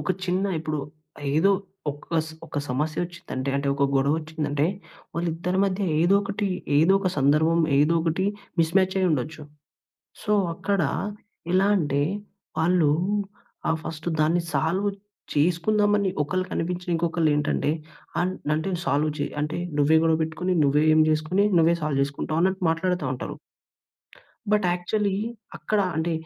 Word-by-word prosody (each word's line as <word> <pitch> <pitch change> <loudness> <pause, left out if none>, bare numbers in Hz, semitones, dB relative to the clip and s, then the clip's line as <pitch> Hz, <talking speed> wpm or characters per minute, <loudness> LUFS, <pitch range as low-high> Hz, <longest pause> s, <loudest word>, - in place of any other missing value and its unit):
ఒక 150 - -2
చిన్న 185 +2 0 0.2
ఇప్పుడు 155 -1 -3 0.6
ఏదో 180 +6 +4 0.4
ఒక 150 +3 -3
స్ 160 - -9
ఒక - - -9
సమస్యొచ్చిందంటే, 150 0 -3
అంటే 140 0 -1
ఒక 140 0 +1
గొడవొచ్చిందంటే, 150 +1 0 0.5
వాళ్ళిద్దరి 170 +2 -1
మధ్య 195 +1 -1 0.2
ఏదోకటి, 200 +3 +2 0.3
ఏదో 165 +6 +5
ఒక 190 - +1
సందర్భం, 155 +4 +3 0.2
ఏదోకటి 165 +3 +2 0.3
మిస్‌మ్యాచయ్యుండొచ్చు. 165 -4 +1 0.8
సో, 210 - -1 0.2
అక్కడ 200 +2 0 0.7
ఎలా 190 +2 +4
అంటే 145 -5 0 0.6
వాళ్ళు 170 -2 +3 0.8
ఆహ్, 160 - +2
ఫస్టు 160 +1 -4
దాన్ని 165 +3 +3
సాల్వ్ 170 +8 +1 0.5
చేసుకుందామని 200 +6 +2
ఒకళ్ళకి 185 +5 -2
అనిపించిన 180 +1 -3
ఇంకొకళ్ళేంటంటే 160 -4 +1 0.5
అన్ 180 +1 +1 0.2
అంటే 160 +5 -1
సాల్వ్ 155 -2 +1
చే 145 - -1
అంటే 150 +1 -2 0.2
నువ్వే 145 +2 +4
గొడవపెట్టుకొని, 160 +3 +1
"నువ్వే 145 +2 +3
ఏం 155 - +5
జేసుకొని 155 +5 +2
నువ్వే 165 +1 +5
సాల్వ్ 150 -3 0
జేసుకుంటావా?" 140 +3 -1
అన్నట్టు 190 +1 +1
మాట్లాడతా 170 0 0
ఉంటరు. 125 - -5 1.2
బట్ 210 -2 +3
యాక్చువల్లీ 195 +3 -1 0.4
అక్కడ 215 -1 0 0.2
అంటే 165 +1 0
165 Hz, 120 wpm, -25 LUFS, 150-185 Hz, 1.2 s, ఏదో